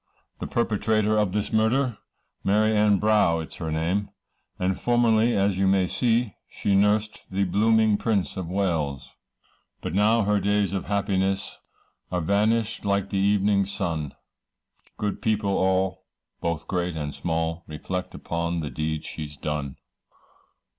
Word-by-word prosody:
The - - -4
perpetrator 110 -1 +1
of 105 -3 +2
this 105 +2 -2
murder, 115 +2 +2 0.4
Mary 110 +2 +3
Ann 105 -1 +4
Brough 105 -5 +3
it 80 - -8
is - - -11
her 80 -2 -4
name, 85 +6 -1 0.5
And 95 0 -1
formerly 120 -1 +3
as 100 -1 +1
you 95 - +3
may 95 -1 +3
see, 115 +3 +1 0.2
She 100 - -1
nursed 105 +2 +1
the 95 +1 0
blooming 110 +3 +3
prince 100 -10 0
of 95 -3 -4
Wales. 80 -8 -2 0.6
But - - -5
now 110 +3 +3
her 105 0 +2
days 100 -1 +1
of 95 - -2
happiness, 95 -1 -1 0.5
Are 90 - 0
vanished 110 +5 +1
like 100 -1 0
the 100 - 0
evening's 100 0 +2
sun, 80 -6 -3 0.8
Good 105 -1 -3
people 105 -2 0
all, 95 0 0 0.3
both 85 -1 -3
great 90 -2 -1
and 75 -1 -4
small, 80 0 -2
Reflect 90 +4 -5
upon 85 0 -2
the 75 - -5
deed 80 0 -3
she's 75 -2 -7
done. 75 -3 -3
100 Hz, 145 wpm, -25 LUFS, 85-105 Hz, 0.8 s, Ann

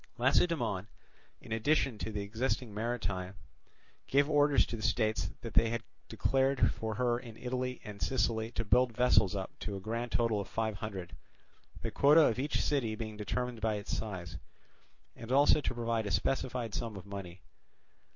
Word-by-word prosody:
Lacedaemon, 120 - +2 0.5
in - - -13
addition 125 0 +1
to 110 - -3
the 105 -1 -3
existing 115 +2 -2
marine, 100 -4 -3 0.7
gave 140 +1 +3
orders 145 -1 +4
to - - -5
the 110 - -6
states 110 -6 +1
that 115 - -7
had 115 +1 +3 0.3
declared 135 0 +2
for 110 -1 -4
her 120 +1 +1
in 115 -3 -11
Italy 125 +1 -3
and 105 -1 -9
Sicily 115 -3 0
to 115 - -2
build 125 +1 +3
vessels 105 -5 +4
up 95 -1 -4
to 105 - -4
a - - -4
grand 115 +4 -3
total 115 -3 +1
of 100 - -7
five 110 -1 -2
hundred, 95 -4 -6 0.7
the - - -2
quota 150 +3 +6
of 125 -5 +3
each 145 +3 0
city 120 -7 0
being 110 -1 -5
determined 120 +2 -3
by 110 0 +1
its 100 -1 -3
size, 90 -6 -5 0.8
and 115 +1 -8
also 145 +3 +5
to 130 - -2
provide 115 -2 -1
a - - -3
specified 120 +3 -1
sum 115 -3 -3
of 100 0 -8
money. 95 -3 -7
115 Hz, 170 wpm, -32 LUFS, 105-125 Hz, 0.8 s, quota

